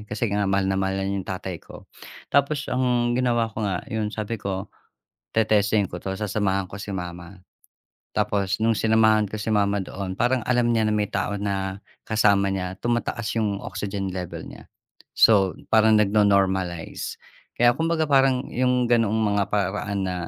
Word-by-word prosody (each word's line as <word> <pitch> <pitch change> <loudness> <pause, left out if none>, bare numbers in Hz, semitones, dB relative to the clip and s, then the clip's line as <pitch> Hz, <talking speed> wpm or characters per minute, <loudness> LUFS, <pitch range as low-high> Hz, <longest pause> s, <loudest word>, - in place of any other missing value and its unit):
Kasi 105 +3 -2
nga 100 -1 +1
mahal 95 0 +1
na - - 0
mahal 95 0 -1
niya 100 0 -2
yung 95 - -11
tatay 95 -2 -5
ko. - - -13 0.5
Tapos, 140 +1 +2
ang 125 -1 +1
ginawa 120 -2 +1
ko 110 - -5
nga, 95 -3 -2
yun 110 -1 -1
sabi 110 +1 -3
ko, 100 +1 -4 0.6
"Te-testingin 105 -2 +2
ko 90 - -7
'to. 95 - -5
Sasamahan 100 -2 -1
ko 95 - -10
si 100 - -6
mama." 90 +1 -7 0.7
Tapos 95 -2 0
nung 115 +1 +2
sinamahan 110 -1 +3
ko 110 - -5
si 110 +1 -1
mama 100 0 +2
doon, 95 0 -5
parang 125 0 +2
alam 120 -1 +2
niya 110 - +2
na - - +1
may 105 -1 +1
tao 100 +1 -2
na 95 -1 -2 0.2
kasama 100 -3 +2
niya, 95 -1 -3
tumataas 120 -2 -1
yung 100 -3 -1
oxygen 95 -1 -4
level 90 -3 -5
niya. - - -12 0.5
So, 100 -4 +5 0.2
parang 110 -1 +5
nagno-normalize. 95 -4 +1 0.4
Kaya, 120 0 +4
kumbaga 160 -1 +1
parang 135 -1 +3
yung 125 -1 +1
gano'ng 115 -3 +3
mga 105 -2 +1
paraan 100 0 -1
na 90 - -2
105 Hz, 165 wpm, -24 LUFS, 95-115 Hz, 0.7 s, So